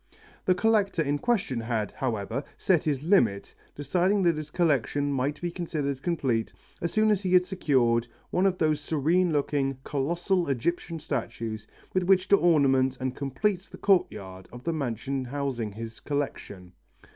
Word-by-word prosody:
The 185 Hz, -, +4 dB
collector 200 Hz, -4 st, +2 dB
in 145 Hz, 0 st, -1 dB
question 200 Hz, -, 0 dB
had, 110 Hz, -3 st, -2 dB
however, 115 Hz, +1 st, -3 dB
set 180 Hz, -4 st, +2 dB
his 145 Hz, -3 st, 0 dB
limit, 160 Hz, -, +2 dB, 0.2 s
deciding 180 Hz, +7 st, +1 dB
that 170 Hz, -2 st, +3 dB
his 155 Hz, -1 st, -6 dB
collection 145 Hz, -3 st, +1 dB
might 140 Hz, +3 st, -1 dB
be 175 Hz, 0 st, -3 dB
considered 150 Hz, -6 st, -3 dB
complete 130 Hz, -10 st, 0 dB, 0.3 s
as 170 Hz, -, -1 dB
soon 215 Hz, 0 st, +3 dB
as 205 Hz, -2 st, +1 dB
he 185 Hz, -2 st, -1 dB
had 180 Hz, 0 st, +6 dB
secured 125 Hz, -11 st, +1 dB, 0.2 s
one 185 Hz, +2 st, +3 dB
of 185 Hz, -1 st, 0 dB
those 155 Hz, -3 st, +1 dB
serene 165 Hz, +5 st, +1 dB
looking, 140 Hz, -2 st, 0 dB
colossal 170 Hz, +6 st, 0 dB
Egyptian 165 Hz, +6 st, -1 dB
statues 110 Hz, -7 st, -4 dB, 0.3 s
with 185 Hz, -, +2 dB
which 185 Hz, 0 st, +3 dB
to 200 Hz, -, +7 dB
ornament 135 Hz, -7 st, +3 dB
and 130 Hz, 0 st, -2 dB
complete 180 Hz, +8 st, -1 dB
the -, -, -9 dB
courtyard 100 Hz, -, 0 dB
of 125 Hz, 0 st, -10 dB
the 165 Hz, -, -1 dB
mansion 135 Hz, -1 st, -2 dB
housing 125 Hz, -5 st, -3 dB
his 115 Hz, +1 st, -7 dB
collection. 100 Hz, -10 st, -4 dB
145 Hz, 155 wpm, -27 LUFS, 125-175 Hz, 0.3 s, to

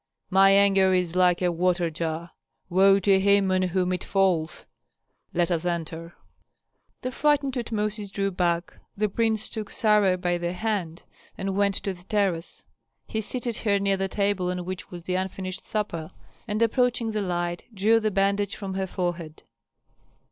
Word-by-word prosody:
"My 195 Hz, +1 st, +6 dB
anger 195 Hz, -1 st, +5 dB
is 180 Hz, -2 st, -1 dB
like 180 Hz, -1 st, +3 dB
a 175 Hz, -, +2 dB
water 175 Hz, 0 st, +1 dB
jar. 165 Hz, +1 st, -4 dB, 0.4 s
Woe 195 Hz, +2 st, +6 dB
to 195 Hz, 0 st, +4 dB
him 200 Hz, 0 st, +3 dB
on 185 Hz, 0 st, +2 dB
whom 185 Hz, 0 st, 0 dB
it 180 Hz, -, -3 dB
falls! 185 Hz, -5 st, 0 dB, 0.7 s
Let 175 Hz, +1 st, 0 dB
us 170 Hz, -1 st, 0 dB
enter." 170 Hz, -1 st, -4 dB, 0.9 s
The 255 Hz, -, -2 dB
frightened 285 Hz, -1 st, +1 dB
Tutmosis 215 Hz, -4 st, -3 dB
drew 195 Hz, 0 st, -1 dB
back. 175 Hz, -1 st, 0 dB, 0.2 s
The 210 Hz, +1 st, +2 dB
prince 220 Hz, +1 st, 0 dB
took 215 Hz, -2 st, -6 dB
Sarah 210 Hz, -5 st, +3 dB
by 175 Hz, -1 st, -1 dB
the 175 Hz, 0 st, -2 dB
hand 185 Hz, -5 st, -3 dB, 0.3 s
and 195 Hz, 0 st, -2 dB
went 200 Hz, -1 st, +2 dB
to 195 Hz, -, -2 dB
the 180 Hz, -1 st, -16 dB
terrace. 195 Hz, -5 st, -1 dB, 0.4 s
He 220 Hz, -, -3 dB
seated 240 Hz, +1 st, -3 dB
her 205 Hz, -3 st, +1 dB
near 195 Hz, 0 st, +1 dB
the 195 Hz, 0 st, -1 dB
table 200 Hz, -2 st, 0 dB
on 180 Hz, -1 st, -3 dB
which 185 Hz, 0 st, -6 dB
was 175 Hz, -1 st, -9 dB
the 180 Hz, -, -3 dB
unfinished 185 Hz, 0 st, -3 dB
supper, 170 Hz, -7 st, -3 dB, 0.4 s
and 215 Hz, +1 st, +1 dB
approaching 240 Hz, -1 st, +1 dB
the 215 Hz, -1 st, -1 dB
light 175 Hz, -2 st, -2 dB
drew 220 Hz, +2 st, +3 dB
the 215 Hz, -1 st, 0 dB
bandage 200 Hz, 0 st, +1 dB
from 195 Hz, -2 st, -5 dB
her 190 Hz, 0 st, -2 dB
forehead. 175 Hz, -4 st, -4 dB
190 Hz, 165 wpm, -26 LUFS, 175-205 Hz, 0.9 s, My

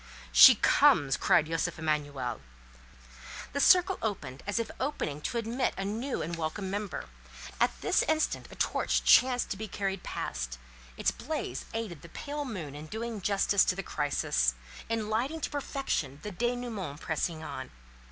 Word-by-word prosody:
"She -, -, +10 dB
comes!" 135 Hz, -2 st, +4 dB
cried -, -, +3 dB
Josef 165 Hz, +1 st, -2 dB
Emanuel. 145 Hz, -6 st, -2 dB, 1.1 s
The 280 Hz, -, -1 dB
circle 365 Hz, +5 st, +5 dB
opened 195 Hz, -, -4 dB
as 205 Hz, -, -1 dB
if 230 Hz, -, -1 dB
opening 205 Hz, -, -2 dB
to 235 Hz, -, -2 dB
admit 235 Hz, +3 st, -1 dB
a 195 Hz, -, -2 dB
new 230 Hz, +7 st, -2 dB
and 170 Hz, +2 st, -3 dB
welcome 170 Hz, +4 st, -3 dB
member. 205 Hz, 0 st, -3 dB, 0.5 s
At -, -, +1 dB
this -, -, +3 dB
instant 315 Hz, 0 st, 0 dB
a -, -, -11 dB
torch -, -, 0 dB
chanced 250 Hz, -1 st, +5 dB
to 195 Hz, -, -2 dB
be 220 Hz, +1 st, -5 dB
carried 195 Hz, -1 st, -3 dB
past; -, -, -4 dB, 0.4 s
its -, -, +2 dB
blaze 125 Hz, -, -4 dB
aided 215 Hz, -9 st, -4 dB
the 170 Hz, -, -12 dB
pale 290 Hz, -, -5 dB
moon 180 Hz, -, -5 dB
in 150 Hz, +2 st, -8 dB
doing 220 Hz, +2 st, -5 dB
justice 200 Hz, 0 st, +3 dB
to 180 Hz, -, +1 dB
the 195 Hz, -, -4 dB
crisis, 60 Hz, -, 0 dB, 0.3 s
in 225 Hz, -2 st, -1 dB
lighting 250 Hz, +9 st, -1 dB
to -, -, -3 dB
perfection 270 Hz, -, -2 dB
the 210 Hz, -, -5 dB
dénouement 225 Hz, -8 st, -3 dB
pressing 160 Hz, 0 st, -2 dB
on. 130 Hz, -4 st, -6 dB
195 Hz, 160 wpm, -30 LUFS, 150-235 Hz, 1.1 s, She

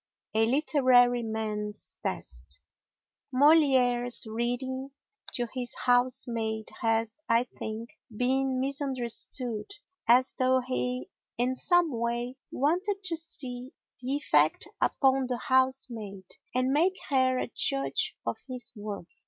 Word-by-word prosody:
A 220 Hz, +1 st, +3 dB
Literary 255 Hz, -3 st, +4 dB
Man's 215 Hz, -2 st, -3 dB
Test -, -, -4 dB, 0.7 s
Molière's 255 Hz, -4 st, +4 dB
reading 245 Hz, +4 st, -3 dB, 0.4 s
to 240 Hz, -1 st, -1 dB
his 250 Hz, -2 st, -2 dB
housemaid 235 Hz, -3 st, +1 dB
has, 225 Hz, +3 st, 0 dB
I 230 Hz, +1 st, +4 dB
think, 230 Hz, -1 st, -7 dB, 0.2 s
been 255 Hz, +3 st, 0 dB
misunderstood 255 Hz, -, -1 dB, 0.4 s
as 250 Hz, +3 st, +5 dB
though 260 Hz, 0 st, +4 dB
he 250 Hz, 0 st, -3 dB, 0.3 s
in 245 Hz, +2 st, +1 dB
some 350 Hz, +4 st, +2 dB
way 240 Hz, +1 st, -2 dB
wanted 370 Hz, +8 st, 0 dB
to 345 Hz, -3 st, -1 dB
see 260 Hz, -6 st, -6 dB, 0.3 s
the 260 Hz, +3 st, -1 dB
effect 155 Hz, -, +2 dB
upon 265 Hz, -1 st, +2 dB
the 250 Hz, -1 st, -2 dB
housemaid 250 Hz, -7 st, 0 dB, 0.3 s
and 255 Hz, +1 st, +2 dB
make 360 Hz, +6 st, +3 dB
her 260 Hz, -2 st, +3 dB
a 245 Hz, -, -3 dB
judge 135 Hz, 0 st, +1 dB
of 115 Hz, -, -2 dB
his 250 Hz, -2 st, -4 dB
work. 205 Hz, -3 st, -6 dB
250 Hz, 110 wpm, -28 LUFS, 230-265 Hz, 0.7 s, as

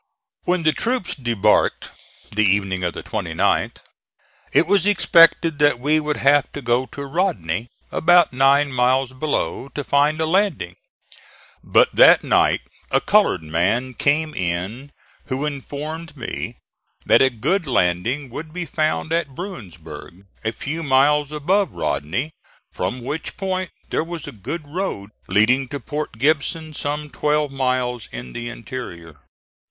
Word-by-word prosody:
When 180 Hz, -1 st, +1 dB
the 155 Hz, -1 st, +3 dB
troops 240 Hz, 0 st, -1 dB
debarked, 120 Hz, -7 st, +1 dB, 0.4 s
the 110 Hz, +1 st, +1 dB
evening 95 Hz, -2 st, +1 dB
of 85 Hz, -, -2 dB
the -, -, -6 dB
29th, -, -, -1 dB, 0.7 s
it -, -, +4 dB
was 195 Hz, +1 st, +2 dB
expected 165 Hz, -5 st, +4 dB
that 145 Hz, -4 st, +3 dB
we 150 Hz, +4 st, +2 dB
would 150 Hz, -1 st, -2 dB
have 145 Hz, +1 st, +3 dB
to 145 Hz, -, -6 dB
go 120 Hz, +2 st, +1 dB
to 140 Hz, -, -7 dB
Rodney, 120 Hz, -, -1 dB, 0.2 s
about 175 Hz, -2 st, +4 dB
nine 140 Hz, +2 st, +4 dB
miles 130 Hz, +1 st, +2 dB
below, 140 Hz, -1 st, -2 dB
to 145 Hz, -, -2 dB
find 145 Hz, +3 st, +2 dB
a 160 Hz, -, +1 dB
landing; 160 Hz, -, 0 dB, 0.9 s
but -, -, +3 dB
that -, -, +7 dB
night -, -, +3 dB, 0.3 s
a -, -, +3 dB
colored -, -, +2 dB
man 100 Hz, +11 st, 0 dB
came 150 Hz, +5 st, +1 dB
in 95 Hz, +10 st, -3 dB, 0.3 s
who 140 Hz, +1 st, -2 dB
informed 150 Hz, +2 st, -6 dB
me 125 Hz, -, -5 dB, 0.5 s
that -, -, +5 dB
a 135 Hz, -, +5 dB
good 150 Hz, -, -1 dB
landing 120 Hz, +6 st, 0 dB
would 155 Hz, +5 st, -7 dB
be 180 Hz, +1 st, -4 dB
found 155 Hz, +1 st, -1 dB
at 160 Hz, -6 st, -1 dB
Bruinsburg, 90 Hz, -, -9 dB, 0.2 s
a 110 Hz, -, 0 dB
few 155 Hz, +7 st, -5 dB
miles 145 Hz, +1 st, +3 dB
above 175 Hz, +5 st, 0 dB
Rodney, 120 Hz, -, -2 dB, 0.4 s
from 100 Hz, +7 st, -3 dB
which 150 Hz, +6 st, -5 dB
point 185 Hz, -1 st, -2 dB, 0.2 s
there -, -, +1 dB
was 170 Hz, -1 st, -7 dB
a -, -, -7 dB
good 140 Hz, -, -6 dB
road 145 Hz, -, -4 dB, 0.2 s
leading 120 Hz, +7 st, +3 dB
to 140 Hz, +2 st, -5 dB
Port 145 Hz, -1 st, -5 dB
Gibson 155 Hz, +4 st, 0 dB
some 150 Hz, 0 st, -4 dB
twelve 150 Hz, -1 st, 0 dB
miles 125 Hz, -3 st, -1 dB
in -, -, -8 dB
the 120 Hz, 0 st, -5 dB
interior. 95 Hz, -, -8 dB
140 Hz, 145 wpm, -21 LUFS, 115-155 Hz, 0.9 s, that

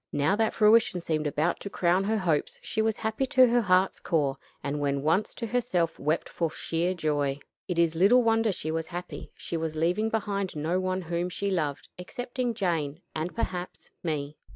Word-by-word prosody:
Now 145 Hz, +7 st, +2 dB
that 220 Hz, +1 st, +1 dB
fruition 215 Hz, -3 st, +5 dB
seemed 155 Hz, -3 st, -1 dB
about 155 Hz, +4 st, 0 dB
to 200 Hz, -, -6 dB
crown 180 Hz, 0 st, +2 dB
her 220 Hz, +2 st, +1 dB
hopes 165 Hz, -7 st, 0 dB
she 220 Hz, -, -1 dB
was 220 Hz, 0 st, +1 dB
happy 220 Hz, +4 st, -1 dB
to 255 Hz, 0 st, +6 dB
her 240 Hz, 0 st, +3 dB
heart's 185 Hz, -2 st, +2 dB
core; 145 Hz, -5 st, 0 dB, 0.3 s
and 145 Hz, +1 st, -2 dB
when 140 Hz, -1 st, 0 dB
once 165 Hz, +7 st, +2 dB
to 235 Hz, -, -4 dB
herself 225 Hz, -8 st, 0 dB
wept 155 Hz, +3 st, 0 dB
for 165 Hz, -2 st, -1 dB
sheer 170 Hz, +3 st, -1 dB
joy. 145 Hz, -4 st, 0 dB, 0.3 s
It 180 Hz, -3 st, -2 dB
is 170 Hz, -1 st, +3 dB
little 200 Hz, +9 st, +5 dB
wonder 225 Hz, -1 st, +3 dB
she 155 Hz, -4 st, -4 dB
was 160 Hz, 0 st, -2 dB
happy. 180 Hz, 0 st, -7 dB
She 170 Hz, -, -4 dB
was 160 Hz, -1 st, -3 dB
leaving 180 Hz, +8 st, +1 dB
behind 200 Hz, -4 st, -2 dB
no 160 Hz, +5 st, 0 dB
one 185 Hz, 0 st, -1 dB
whom 170 Hz, +1 st, -2 dB
she 200 Hz, +2 st, -2 dB
loved 150 Hz, -6 st, -1 dB
excepting 245 Hz, +5 st, -3 dB
Jane, 165 Hz, -6 st, -1 dB
and 160 Hz, +3 st, -3 dB
perhaps, 185 Hz, -6 st, -4 dB
me. 150 Hz, -3 st, -3 dB
180 Hz, 190 wpm, -28 LUFS, 155-215 Hz, 0.3 s, to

